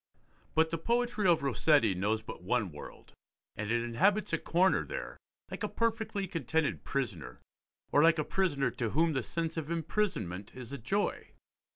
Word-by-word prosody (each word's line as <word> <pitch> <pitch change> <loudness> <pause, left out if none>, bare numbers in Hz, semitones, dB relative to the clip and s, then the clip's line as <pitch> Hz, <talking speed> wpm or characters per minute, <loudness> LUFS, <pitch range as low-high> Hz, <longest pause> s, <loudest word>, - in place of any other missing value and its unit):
But 160 0 +3
the 165 - -2
poetry 235 0 +1
of 170 -4 +4
Rossetti 140 -4 +3
knows 105 +4 0
but - - -8
one - - 0
world, - - -11 0.4
and 105 -1 -4
it 120 0 +1
inhabits 190 - +2
a 165 - +2
corner 185 +3 +3
there, - - -6 0.3
like - - -6
a - - -1
perfectly 220 -3 -1
contented 160 -3 -1
prisoner, 85 - -3 0.5
or 145 - +5
like 165 +1 +5
a 155 - +1
prisoner 145 -9 0
to 115 -2 -2
whom 160 +6 +2
the 130 - 0
sense 165 +5 -3
of 155 -1 -3
imprisonment 160 - -2
is 125 0 -8
a 140 - -5
joy. 195 - -2
160 Hz, 170 wpm, -31 LUFS, 120-190 Hz, 0.5 s, or